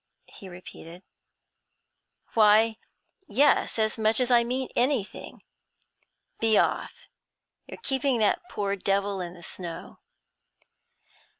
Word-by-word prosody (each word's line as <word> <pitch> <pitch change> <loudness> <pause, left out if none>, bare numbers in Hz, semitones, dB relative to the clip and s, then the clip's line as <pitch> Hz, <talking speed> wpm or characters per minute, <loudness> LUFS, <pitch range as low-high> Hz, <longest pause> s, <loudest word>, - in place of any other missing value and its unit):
he 195 - -13
repeated, 175 0 -12 1.3
'why, 220 0 +4 0.5
yes, 280 +3 +2
as 220 0 0
much 220 +2 +2
as 250 0 0
I 240 -1 +5
mean 255 +2 -3
anything. 245 -4 -1 1.0
Be 220 -2 +4
off; - - -1 0.6
you're - - -9
keeping 270 -1 0
that 215 -2 +1
poor 200 -1 -2
devil 195 0 -1
in 175 0 -7
the 175 - -14
snow.' 170 0 -8
215 Hz, 105 wpm, -26 LUFS, 195-240 Hz, 1.3 s, I